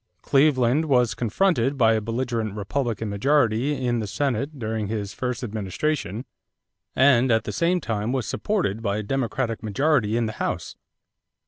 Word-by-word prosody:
Cleveland 135 0 +3
was 125 -6 +3
confronted 135 - +1
by 115 -3 +4
a 110 - 0
belligerent 115 -2 -2
Republican 110 +2 -2
majority 125 +4 +2
in 120 -1 +1
the 110 - -3
Senate 140 +4 -2
during 110 -3 -3
his 105 -2 -4
first 125 -1 -3
administration; 110 - -3 0.7
and 130 -2 +4
at 115 0 +3
the - - -4
same 175 +2 +1
time 110 -5 -2
was 130 -3 -1
supported 175 - -1
by 100 -2 -1
a 110 - -3
Democratic 120 0 -2
majority 115 0 +1
in 120 - +1
the 110 - -2
House. - - -3
120 Hz, 150 wpm, -24 LUFS, 110-135 Hz, 0.7 s, by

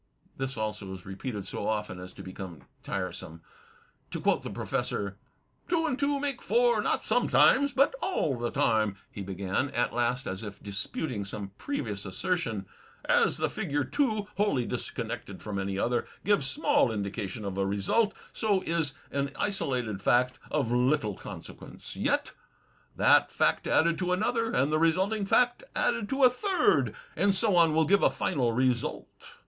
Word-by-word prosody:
This 135 -1 -4
also 105 -3 -3
is 90 - -12
repeated 100 +1 -5
so 100 - -4
often 105 -4 -2
as 90 0 -8
to - - -10
become 95 -3 -8 0.2
tiresome. 90 -3 -5 0.7
To - - -4
quote - - +2
the - - -6
Professor: 100 0 -2 0.5
"Two 335 -2 +2
and 265 -5 -1
two 280 0 +1
make 275 -3 -2
four, 480 0 +3
not - - 0
sometimes^ 280 +1 +4
but 275 - +4
aU 260 - 0
the 120 - 0
time," 110 -4 +2 0.2
he 100 - -7
began, 95 +7 -2
at 120 -1 0
last 120 +2 0
as 95 0 -4
if 105 -3 -8
disputing 100 +4 -3
some 100 0 -6
previous 110 - -3
assertion. 110 - -2 0.4
"As - - +3
the - - +1
figure 145 0 -1
two, 215 - 0
wholly 195 - +2
disconnected - - -5
from 100 -2 -3
any 95 0 -2
other, 120 +4 0 0.2
gives 200 -9 +3
small 290 - +2
indica 100 0 -3
tion 105 +3 -7
of 100 -1 -3
a 95 - +2
result, 105 - +1 0.2
so 205 -4 +1
is 160 -4 0 0.2
an 140 0 -1
isolated 125 - -1
fact 125 +4 +2
of 115 - 0
little 125 -2 +2
consequence. - - -9
Yet - - 0 0.6
that - - +5
fact - - +1
added 170 +1 +3
to 180 -1 +1
another, 225 +4 0
and 135 +4 +2
the 155 - +2
resulting 190 +6 +2
fact 245 - +3
added 480 - 0
to 270 0 +1
a 255 - +9
third, 380 +9 +2 0.2
and 200 -1 +3
so 205 -1 +2
on, 165 -3 +5
will 160 0 +4
give 200 +5 +4
a - - +5
final 130 -9 0
result. 125 0 0
130 Hz, 165 wpm, -29 LUFS, -, 0.7 s, a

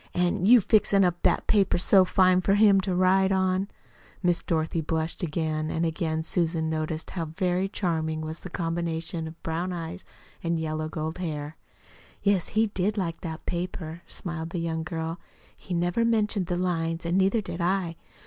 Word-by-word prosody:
"An' 180 +2 +1
you 240 0 +8
fixin' 200 -1 +4
up 175 -1 0
that - - +2
paper 200 -3 +3
so 190 +2 +5
fine 185 0 +4
for 195 +2 +3
him 205 -2 +6
to 185 -1 -1
write 190 +1 +4
on!" 190 0 +1 0.6
Miss 175 -1 +2
Dorothy 160 0 -1
blushed 160 +2 -2
again 155 -2 -1
and 165 +1 0
again 160 -1 -1
Susan 165 -2 0
noticed 155 0 -3
how 170 -3 -3
very 180 +4 0
charming 160 -5 -1
was 155 +1 -5
the 185 - -7
combination 165 -1 -3
of 160 +1 -12
brown 170 +3 -2
eyes 175 +1 -5 0.4
and 170 -1 0
yellow 155 0 -2
gold 160 +2 -4
hair. 155 -3 -4 0.7
"Yes, 200 -4 +2
he 220 - +5
did 205 0 -1
like 170 -4 -2
that 160 -2 -6
paper," 170 -2 -4
smiled 165 -3 -5
the 175 - -4
young 165 -1 -2
girl. 165 0 -4 0.4
"He 180 - -5
never 175 +6 +1
mentioned 215 -5 +1
the 180 - -1
lines, 165 -2 -1
and 170 +1 0
neither 195 +4 +3
did 175 -3 -6
I. 175 -1 0
175 Hz, 175 wpm, -27 LUFS, 160-185 Hz, 0.7 s, you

